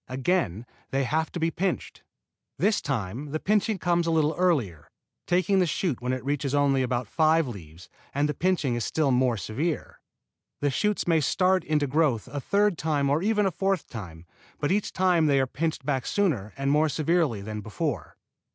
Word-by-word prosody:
Again 130 Hz, -, -1 dB, 0.2 s
they 135 Hz, +1 st, 0 dB
have 155 Hz, +5 st, -1 dB
to 175 Hz, -, -5 dB
be 165 Hz, 0 st, +1 dB
pinched. 190 Hz, +3 st, -3 dB, 0.6 s
This 210 Hz, 0 st, +2 dB
time 125 Hz, +1 st, -3 dB
the 155 Hz, +2 st, -2 dB
pinching 210 Hz, +2 st, +1 dB
comes 175 Hz, -1 st, +1 dB
a -, -, +2 dB
little 155 Hz, -1 st, +2 dB
earlier, 125 Hz, -, 0 dB, 0.4 s
taking 185 Hz, +2 st, +2 dB
the 180 Hz, -, +3 dB
shoot 155 Hz, -6 st, -1 dB
when 125 Hz, +1 st, -1 dB
it 130 Hz, 0 st, -3 dB
reaches 145 Hz, 0 st, -1 dB
only 140 Hz, -2 st, +3 dB
about 125 Hz, -2 st, -1 dB
five 160 Hz, +3 st, +3 dB
leaves 85 Hz, -7 st, -10 dB, 0.2 s
and 145 Hz, +2 st, +1 dB
the 150 Hz, -, -1 dB
pinching 170 Hz, -8 st, 0 dB
is 120 Hz, -1 st, -1 dB
still 150 Hz, +1 st, +1 dB
more 125 Hz, -2 st, +2 dB
severe. 140 Hz, -, -3 dB, 0.6 s
The 145 Hz, -1 st, +1 dB
shoots 210 Hz, +8 st, 0 dB
may 165 Hz, -2 st, +3 dB
start 185 Hz, +6 st, +2 dB
into 150 Hz, -2 st, +1 dB
growth 140 Hz, -5 st, +1 dB
a 145 Hz, -, -4 dB
third 200 Hz, +2 st, +1 dB
time 145 Hz, -3 st, +1 dB
or 150 Hz, +3 st, +2 dB
even 210 Hz, +1 st, +2 dB
a 190 Hz, -, +1 dB
fourth 195 Hz, +1 st, -1 dB
time, 85 Hz, -8 st, -8 dB, 0.3 s
but 145 Hz, -, 0 dB
each 205 Hz, +1 st, 0 dB
time 180 Hz, -4 st, +3 dB
they 140 Hz, -2 st, +3 dB
are 135 Hz, -, +2 dB
pinched 155 Hz, +2 st, -3 dB
back 135 Hz, -4 st, -1 dB
sooner 140 Hz, -, 0 dB
and 135 Hz, 0 st, 0 dB
more 155 Hz, +2 st, +3 dB
severely 155 Hz, -, 0 dB
than 105 Hz, +1 st, -5 dB
before. 110 Hz, -, -4 dB
150 Hz, 190 wpm, -26 LUFS, 125-175 Hz, 0.6 s, the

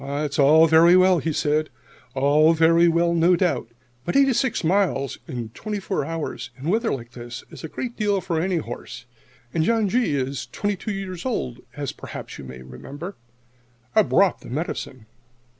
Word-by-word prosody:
"It's 145 Hz, +1 st, -3 dB
all 155 Hz, +3 st, +7 dB
very 165 Hz, +3 st, +6 dB
well," 185 Hz, -2 st, +4 dB
said 155 Hz, -1 st, 0 dB, 0.5 s
he, -, -, -2 dB
"all 150 Hz, +4 st, +5 dB
very 165 Hz, +1 st, +4 dB
well, 170 Hz, +1 st, +2 dB
no 170 Hz, +2 st, +4 dB
doubt. 175 Hz, -7 st, 0 dB, 0.4 s
But 175 Hz, -, -3 dB
eighty 275 Hz, -1 st, +5 dB
six 255 Hz, -3 st, 0 dB
miles 160 Hz, -7 st, +1 dB
in 120 Hz, -3 st, -5 dB
twenty 210 Hz, -, -5 dB
four 195 Hz, 0 st, -2 dB
hours, 155 Hz, -8 st, -5 dB
in 140 Hz, +5 st, -4 dB
weather 225 Hz, +4 st, +1 dB
like 120 Hz, -3 st, -5 dB
this, 120 Hz, +1 st, -8 dB
is -, -, -11 dB
a -, -, -4 dB
good 240 Hz, -, -5 dB
deal 205 Hz, -2 st, +1 dB
for 170 Hz, -4 st, -2 dB
any 185 Hz, 0 st, 0 dB
horse. 120 Hz, -4 st, -7 dB, 0.5 s
And 160 Hz, -, +1 dB
John 225 Hz, +2 st, +2 dB
G. 225 Hz, -9 st, +1 dB
is 135 Hz, 0 st, -3 dB
twenty 205 Hz, 0 st, -1 dB
two 205 Hz, +3 st, -5 dB
years 190 Hz, -3 st, -5 dB
old, 130 Hz, -, -3 dB, 0.2 s
as 140 Hz, -2 st, -3 dB
perhaps -, -, -9 dB
you -, -, -8 dB
may 65 Hz, 0 st, -10 dB
remember. 140 Hz, -, -9 dB, 0.8 s
_I've 215 Hz, -2 st, +4 dB
brought 195 Hz, -2 st, +3 dB
the -, -, -11 dB
medicine. 130 Hz, -4 st, -4 dB
165 Hz, 180 wpm, -23 LUFS, 140-190 Hz, 0.8 s, all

